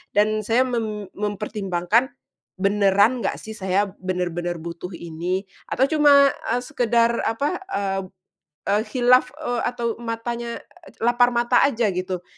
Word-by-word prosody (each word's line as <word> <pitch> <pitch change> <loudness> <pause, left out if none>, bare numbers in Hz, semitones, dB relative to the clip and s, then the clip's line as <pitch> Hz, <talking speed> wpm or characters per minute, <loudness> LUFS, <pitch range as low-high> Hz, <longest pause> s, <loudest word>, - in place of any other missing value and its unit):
dan 215 +1 +3
saya 235 +4 +3
mem 215 -6 -3
mempertimbangkan, 205 +1 0 0.5
beneran 200 +4 +3
nggak 205 - -1
sih 220 - -8
saya 190 -1 +1 0.2
benar-benar 175 -2 -2
butuh 170 +2 -7
ini, 170 +3 -3 0.2
atau 260 - 0
cuma, 285 -2 +6 0.2
eee, 245 - -1
sekedar 235 -4 +1
apa, 285 +10 -1
eee 195 - -1 0.6
eee, 205 +1 +2
khilaf, 250 +2 +4 0.2
eee, 245 -3 -1
atau 235 -2 -2
matanya, 235 0 -4 0.3
e - - -13
lapar 240 +1 +4
mata 240 0 +2
aja 240 -4 +2
gitu. 180 0 -4
215 Hz, 130 wpm, -23 LUFS, 190-240 Hz, 0.6 s, cuma